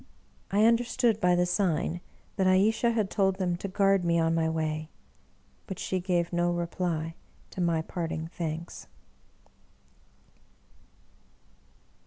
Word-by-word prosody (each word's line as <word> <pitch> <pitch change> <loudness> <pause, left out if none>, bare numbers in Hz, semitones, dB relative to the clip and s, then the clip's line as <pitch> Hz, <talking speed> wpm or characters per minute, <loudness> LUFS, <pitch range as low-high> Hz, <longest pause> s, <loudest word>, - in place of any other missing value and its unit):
I 205 +2 +3
understood 230 -1 +2
by 180 -3 +3
the 175 0 +2
sign 175 -2 0 0.3
that 190 -3 +2
Ayesha 215 +5 +3
had 220 -4 0
told 195 -2 +2
them 185 -2 -1
to 195 - -5
guard 195 0 +2
me 170 -1 +2
on 165 0 +2
my 165 -1 +1
way; 155 -1 -2 0.8
but 190 - -5
she 185 - -2
gave 175 -1 0
no 175 0 +2
reply 170 -2 -2 0.4
to 185 - -4
my 165 -2 +1
parting 160 -2 -4
thanks. 165 0 -5
175 Hz, 125 wpm, -28 LUFS, 165-195 Hz, 0.8 s, I